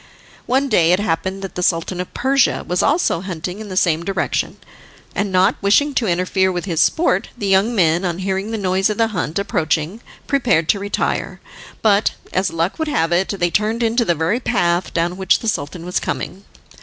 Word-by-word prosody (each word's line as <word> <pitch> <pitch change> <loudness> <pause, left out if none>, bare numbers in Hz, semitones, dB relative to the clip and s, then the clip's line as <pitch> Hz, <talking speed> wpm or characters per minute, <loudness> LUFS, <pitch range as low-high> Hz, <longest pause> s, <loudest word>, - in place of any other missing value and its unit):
One 270 +2 +2
day 175 -9 +3
it 180 - +2
happened 190 +1 -2
that 195 - -6
the 180 - -4
Sultan 175 +1 0
of 180 - -7
Persia 270 +1 +2
was 180 +2 +1
also 285 - +1
hunting 180 +1 -5
in 215 -1 -8
the 185 - -5
same 170 -3 +2
direction, 195 +2 -2 0.6
and, 200 -1 -1
not 185 +4 +3
wishing 280 +9 +3
to 235 -4 0
interfere 185 +1 +1
with 175 0 -3
his 170 -4 0
sport, 240 - +2
the 205 - -4
young 195 +4 +2
men, 170 -2 +3
on 175 -2 -1
hearing 190 +2 -2
the 225 - -2
noise 190 0 +1
of 210 - -2
the 225 -1 +2
hunt 165 -5 -3
approaching, 180 -1 -1 0.2
prepared 240 - +1
to 200 - +3
retire, 200 +1 -2 0.4
but, 210 -1 +3 0.2
as 185 +1 +1
luck 165 - -2
would 315 - -1
have 165 - 0
it, 180 +2 +2
they 175 -2 0
turned 220 +4 0
into 230 +2 +2
the 175 -6 +1
very 165 +9 0
path 175 -8 0
down 175 +2 -1
which 190 -1 +3
the 230 - -6
Sultan 165 -3 -3
was 180 - -1
coming. 195 +2 -5
190 Hz, 200 wpm, -19 LUFS, 175-215 Hz, 0.6 s, day